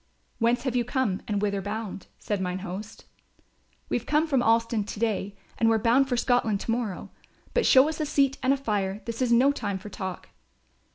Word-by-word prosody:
"Whence 235 +1 +2
have 260 -3 -2
you 245 - +2
come 245 -6 -1
and 205 -1 -1
whither 200 -1 0
bound?" 205 -2 -5
said 205 -2 -3
mine 180 0 -2
host. 205 +4 -7 0.8
"We've 240 +1 -2
come 300 +2 +3
from 275 -6 +1
Alston 230 -1 +2
to 205 0 -7
day 205 -3 -1 0.2
and 225 - +4
we're 225 - +4
bound 245 +5 +3
for 245 - 0
Scotland 235 -5 +2
to - - -2
morrow. 225 -5 -3 0.4
But 485 - +2
show 265 +2 +7
us 315 0 -4
a - - 0
seat 275 -2 +1
and 260 - +2
a 275 - +3
fire, 205 -6 -2
this 230 +1 -5
is 250 -2 +1
no 255 +4 +5
time 205 -8 -3
for 210 +3 -9
talk." 185 -2 -6
230 Hz, 205 wpm, -26 LUFS, 205-255 Hz, 0.8 s, show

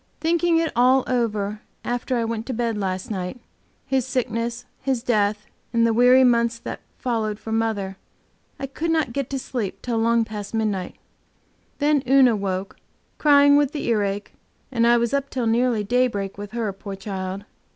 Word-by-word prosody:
Thinking 335 +1 +2
it 330 -1 +1
all 255 +2 +5
over 215 -4 -1 0.2
after 245 +1 -1
I 230 - 0
went 225 0 -4
to 260 - -2
bed 230 -1 -1
last 190 -1 -3
night, 190 +4 -4 0.5
his 265 -1 +1
sickness, 235 -1 -2 0.2
his 260 -4 -1
death, 210 -3 +1 0.3
and 230 -1 +3
the 230 - +2
weary 250 +3 +6
months 235 -2 +3
that 230 - -7 0.2
followed 220 -4 -1
for 220 - -8
mother, 215 -4 -1 0.6
I - - -3
could 305 +5 -3
not 315 -7 +1
get 275 -1 -2
to 275 - -2
sleep 240 -6 -4
till 235 -2 -1
long 230 0 +3
past 210 -1 -6
midnight. 210 -5 -1 0.8
Then 295 -1 +2
Una 260 -4 +6
woke, 195 -1 -3 0.4
crying 285 -1 +6
with 290 -1 +2
the 295 - -3
earache, 205 -2 -1 0.4
and 235 -2 +2
I 240 0 +6
was 235 +1 0
up 280 0 0
till 250 -3 -2
nearly 230 -1 +2
daybreak 205 -3 0
with 205 +1 -8
her, 225 -4 -2
poor 195 0 -7
child. 195 0 -5
230 Hz, 170 wpm, -23 LUFS, 210-255 Hz, 0.8 s, weary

